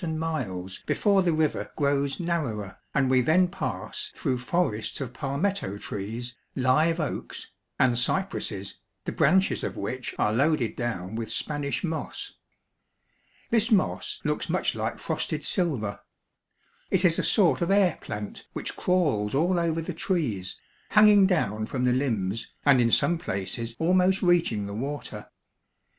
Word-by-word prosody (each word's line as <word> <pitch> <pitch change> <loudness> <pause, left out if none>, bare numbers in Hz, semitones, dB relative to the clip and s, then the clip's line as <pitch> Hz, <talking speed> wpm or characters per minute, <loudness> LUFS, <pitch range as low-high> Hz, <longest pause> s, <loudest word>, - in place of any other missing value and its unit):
and 160 -2 -2
miles 100 - -3
before 200 -2 +3
the 175 -2 +2
river 155 -2 0
grows 140 -1 0
narrower, 135 - -2 0.2
and 140 -2 +2
we 130 0 +4
then 175 +8 +4
pass 310 - -4
through 135 -6 -1
forests 125 -5 -1
of 125 -3 -5
palmetto 140 - -2
trees, 115 +5 -5 0.2
live 155 +6 +3
oaks, 155 - -4 0.3
and 125 -2 +3
cypresses, 125 - -1 0.3
the - - -2
branches 190 +6 +3
of - - -3
which 125 +5 -4
are 105 - +2
loaded 140 -1 +1
down 110 -6 -3
with 110 -1 -4
Spanish 145 +5 -1
moss. 165 -2 -4 1.2
This 230 0 +3
moss 205 -5 +1
looks - - -1
much - - +1
like - - -3
frosted - - -3
silver. 120 - 0 0.9
It 190 0 +2
is 165 -2 +4
a - - 0
sort 195 -6 +3
of 170 - 0
air 195 -4 +3
plant 105 0 -6
which - - -4
crawls 145 - +1
all 175 +5 +2
over 165 -1 0
the 180 - -4
trees, 140 - -2 0.3
hanging 210 -2 +7
down 110 - 0
from 125 0 -1
the 125 - +3
limbs, 115 -6 -1
and 140 -3 +6
in 115 - +3
some 170 +8 +3
places 115 - -3
almost 185 +4 +3
reaching 165 - +2
the 100 - -6
water. 140 +7 -5
140 Hz, 145 wpm, -27 LUFS, 115-175 Hz, 1.2 s, hanging